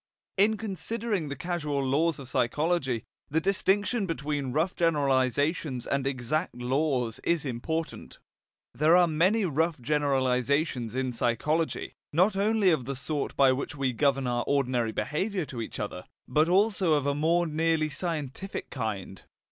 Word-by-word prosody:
In 210 +3 +3
considering 210 -3 -3
the 140 - -4
causal 150 -2 -2
laws 155 +4 +2
of 135 - -9
psychology, 135 0 0 0.3
the 160 - +2
distinction 195 +4 +1
between 145 -5 -2
rough 160 +7 0
generalizations 140 -3 +1
and 140 -1 -1
exact 140 +4 -2
laws 125 -2 0
is 170 -3 +1
important. 155 +6 -4 0.6
There 160 +4 +5
are 180 - +6
many 185 +7 +2
rough 160 -1 0
generalizations 130 -2 0
in 130 -1 -1
psychology, 150 +8 -1 0.2
not 185 +6 +3
only 205 -1 +3
of 150 -7 0
the 140 +2 -3
sort 145 +2 -2
by 135 -1 +5
which 140 +3 -3
we 135 -3 0
govern 135 +1 +1
our 120 -1 0
ordinary 125 -5 +1
behaviour 160 - -2
to 125 -4 -6
each 110 - -6
other, 95 -3 -5 0.2
but 155 +5 +2
also 190 -3 +3
of 145 -2 0
a 140 - +2
more 165 +4 +2
nearly 160 0 +1
scientific 165 +2 -4
kind. 100 -7 -4
150 Hz, 145 wpm, -28 LUFS, 130-170 Hz, 0.6 s, are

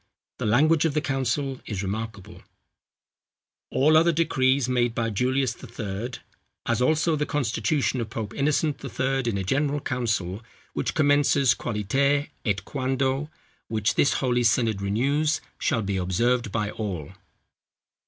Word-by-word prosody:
The - - -1
language 150 +8 +4
of 155 -3 0
the - - +3
council 135 -1 -1
is 100 -3 -3
remarkable: 100 0 -5 1.3
"All 155 +4 +3
other 165 +2 +5
decrees 135 -5 +2
made 120 -2 +1
by 115 -1 -1
Julius 130 +3 +1
the 130 - -12
Third, 115 +1 -5 0.4
as 115 +1 0
also 155 +4 +2
the 150 0 -1
constitution 130 -1 0
of 110 - -4
Pope 110 -2 -5
Innocent 145 0 +1
the - - -6
Third, 135 -1 -1
in 110 -4 0
a 95 - -2
general 145 +8 0
council, 110 -7 -2 0.3
which - - -2
commences 145 -3 +4
Qualiter 135 +7 0
et 100 -4 -1
Quando, 135 +1 -1 0.4
which 110 0 0
this 140 - +3
holy 125 -2 +1
synod 115 -3 +2
renews, 140 +10 +1 0.2
shall 115 -6 0
be 100 -1 -1
observed 115 +6 +1
by 105 -1 -1
all." 95 -8 -5
125 Hz, 145 wpm, -25 LUFS, 110-140 Hz, 1.3 s, other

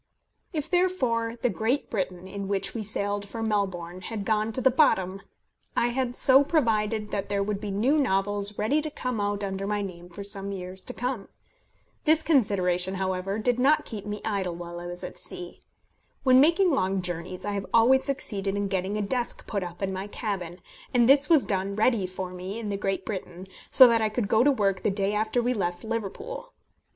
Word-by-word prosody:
If 310 -4 -3
therefore 260 -11 +1
the 245 - +4
Great 245 +6 -1
Britain, 185 -3 -3
in 200 +1 -5
which 195 -1 -1
we 230 - -3
sailed 205 -1 -2
for 225 -1 -4
Melbourne, 185 -5 -2
had 205 +1 -5
gone 215 0 +1
to 260 - -1
the 265 +1 +4
bottom, 195 - +2 0.6
I 240 - +3
had 245 0 -1
so 270 +2 +6
provided 220 -8 +1
that 200 -1 -3
there 200 -1 +1
would 205 0 -3
be 210 - -4
new 240 +10 +2
novels 205 -4 +1
ready 275 +9 +1
to 310 - -2
come 255 -6 -3
out 205 0 -1
under 195 0 -3
my 205 0 -1
name 175 -2 -8
for 200 +3 -8
some 200 0 -3
years 185 -1 -7
to - - -6
come. 245 -4 -3 0.8
This 315 +1 +4
consideration, 190 - +2
however, 190 +1 -2
did 245 +2 +1
not 285 +4 +4
keep 210 -2 -7
me 210 0 -4
idle 195 -5 -1
while 175 0 -7
I 175 - -7
was 175 0 -7
at - - -6
sea. 175 -1 -5 0.6
When 255 -1 +6
making 340 +5 +4
long 190 -8 0
journeys, 180 +1 -4
I 205 - -1
have 200 -1 -3
always 250 +4 +5
succeeded 200 -8 -2
in 200 -1 -1
getting 190 +2 -1
a 210 - -1
desk 240 +4 -2
put 200 -3 -2
up 175 +1 -6
in 190 0 -1
my 190 +2 -4
cabin, 190 -5 -4 0.3
and 240 -1 +5
this 280 +2 +5
was 315 -5 +5
done 195 0 -1
ready 215 -3 +2
for 185 0 -6
me 185 +3 -6
in 225 -2 -4
the 200 - -1
Great 195 -1 -2
Britain, 185 -3 -6 0.2
so 260 - +9
that 230 -1 +3
I 220 - +2
could 215 -1 -2
go 220 +3 +4
to 285 - +5
work 195 -7 +1
the - - +1
day 195 0 +1
after 220 +3 0
we 250 +1 +1
left 175 -5 -2
Liverpool. 230 - -5
205 Hz, 205 wpm, -27 LUFS, 190-240 Hz, 0.8 s, so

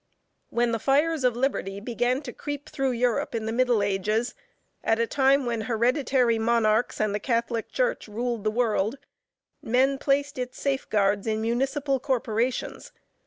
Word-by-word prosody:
When 235 0 +1
the 230 - -1
fires 290 +4 +2
of 250 -2 +3
liberty 240 -6 -1
began 245 +5 -1
to 245 -4 -7
creep 290 0 -6
through 270 -3 -1
Europe 240 0 0
in 220 -1 -2
the 220 - -2
middle 240 -3 +2
ages, 210 +4 0 0.5
at 225 - +2
a 230 - +2
time 270 +2 +3
when 235 -2 -1
hereditary 245 +1 +1
monarchs 225 0 +2
and 215 -1 +1
the 210 - -1
catholic 235 0 -1
church - - -1
ruled 230 +1 -3
the 215 - +2
world, 220 +1 0 0.6
men 265 +4 +2
placed 280 -1 0
its 250 0 -5
safeguards 210 -7 0
in 220 0 0
municipal 270 +4 0
corporations. 245 -2 -2
240 Hz, 155 wpm, -26 LUFS, 220-270 Hz, 0.6 s, of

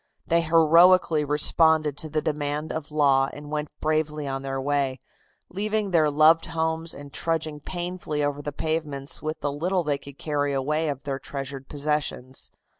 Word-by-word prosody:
They 170 0 +2
heroically 165 0 +5
responded 150 +1 +4
to 155 - -5
the 155 0 -1
demand 150 0 -2
of 160 -2 -5
law 140 -3 +3
and 145 0 -9
went 150 -1 -2
bravely 155 -1 -1
on 135 0 -3
their 135 0 -3
way, 135 -1 -1 0.5
leaving 210 +1 -2
their 160 -3 +4
loved 155 +3 +4
homes 160 0 -2
and 145 -1 -11
trudging 160 -2 -1
painfully 175 -2 -4
over 145 0 -1
the 145 - -4
pavements 150 -2 -4
with 155 0 -4
the 145 - -1
little 175 +5 -1
they 145 -2 -1
could 140 0 -12
carry 145 -3 -1
away 150 +4 0
of 140 -2 -5
their 135 -1 -3
treasured 135 -1 -6
possessions. 145 -3 -3
150 Hz, 165 wpm, -25 LUFS, 145-160 Hz, 0.5 s, heroically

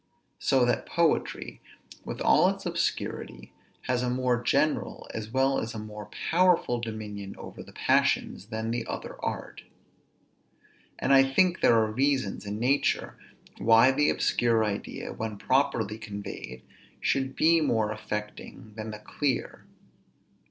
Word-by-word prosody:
So 130 -2 +3
that 120 -2 0
poetry, 170 -2 0 0.4
with - - -6
all - - +5
its - - -5
obscurity, - - -3 0.3
has 125 -1 -1
a 125 - 0
more 125 -1 +1
general, 150 +5 0
as 110 -1 -5
well 135 +2 +2
as 115 0 -5
a - - -4
more 105 -1 -8 0.2
powerful 170 -8 +3
dominion 105 -3 -6
over - - -9
the - - -12
passions, 100 - +1
than 110 0 -3
the 120 -1 -3
other - - -6
art. - - -4 1.4
And 135 - +2
I 135 - +8
think 175 +7 +2
there 115 - +5
are 110 -1 +2
reasons 130 -5 0
in 105 +1 -4
nature, 135 +5 +1 0.5
why 115 +5 +6
the 150 +2 +2
obscure 115 -2 +2
idea, 100 -1 -4
when 110 -2 -5
properly 115 -4 +1
conveyed, 100 - -7 0.4
should 135 -1 0
be 165 +1 +4
more 110 -7 +1
affecting 105 +1 -6
than 110 0 -5
the 105 - -6
clear. 130 +4 -3
115 Hz, 140 wpm, -28 LUFS, 110-135 Hz, 1.4 s, I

